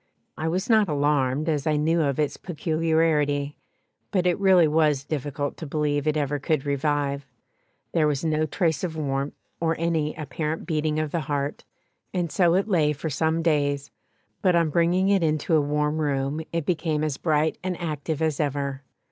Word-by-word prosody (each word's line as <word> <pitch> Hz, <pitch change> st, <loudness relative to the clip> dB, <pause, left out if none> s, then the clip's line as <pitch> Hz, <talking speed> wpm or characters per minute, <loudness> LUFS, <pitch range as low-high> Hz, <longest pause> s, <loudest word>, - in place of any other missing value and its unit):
I 155 Hz, -, -3 dB
was 185 Hz, +4 st, -1 dB
not 220 Hz, -5 st, +4 dB
alarmed, 145 Hz, 0 st, +1 dB
as 150 Hz, -2 st, 0 dB
I 155 Hz, -, +2 dB
knew 160 Hz, +3 st, +2 dB
of 140 Hz, -3 st, 0 dB
its 150 Hz, -2 st, 0 dB
peculiarity, 155 Hz, -3 st, 0 dB, 0.5 s
but 185 Hz, -3 st, 0 dB
it 180 Hz, +1 st, +2 dB
really 190 Hz, -4 st, +5 dB
was 150 Hz, -3 st, +2 dB
difficult 145 Hz, -1 st, -3 dB
to 160 Hz, -, -7 dB
believe 145 Hz, 0 st, 0 dB
it 155 Hz, 0 st, +2 dB
ever 145 Hz, 0 st, -1 dB
could 150 Hz, 0 st, 0 dB
revive; 140 Hz, 0 st, 0 dB, 0.7 s
there 160 Hz, -3 st, +2 dB
was 145 Hz, +1 st, -1 dB
no 155 Hz, 0 st, +1 dB
trace 160 Hz, -2 st, 0 dB
of 165 Hz, -3 st, -3 dB
warmth, 140 Hz, -1 st, -2 dB, 0.2 s
or 165 Hz, -1 st, +1 dB
any 160 Hz, -2 st, 0 dB
apparent 155 Hz, +1 st, -4 dB
beating 155 Hz, -2 st, 0 dB
of 155 Hz, -1 st, -1 dB
the 170 Hz, -, 0 dB
heart, 145 Hz, -1 st, -3 dB, 0.5 s
and 175 Hz, -3 st, -1 dB
so 175 Hz, 0 st, +3 dB
it 195 Hz, +3 st, +1 dB
lay 160 Hz, -7 st, +2 dB
for 150 Hz, +2 st, -4 dB
some 160 Hz, +3 st, 0 dB
days, 145 Hz, -3 st, +1 dB, 0.5 s
but 180 Hz, -3 st, +3 dB
on 165 Hz, -2 st, +2 dB
bringing 175 Hz, +4 st, +2 dB
it 200 Hz, -2 st, +3 dB
into 155 Hz, 0 st, 0 dB
a 155 Hz, -, +4 dB
warm 150 Hz, +1 st, 0 dB
room 140 Hz, 0 st, -1 dB
it 165 Hz, -3 st, -2 dB
became 160 Hz, -3 st, 0 dB
as 150 Hz, -3 st, -1 dB
bright 155 Hz, -1 st, +1 dB
and 185 Hz, -1 st, -3 dB
active 155 Hz, -1 st, -3 dB
as 155 Hz, -3 st, 0 dB
ever. 140 Hz, -2 st, -2 dB
155 Hz, 180 wpm, -25 LUFS, 145-165 Hz, 0.7 s, really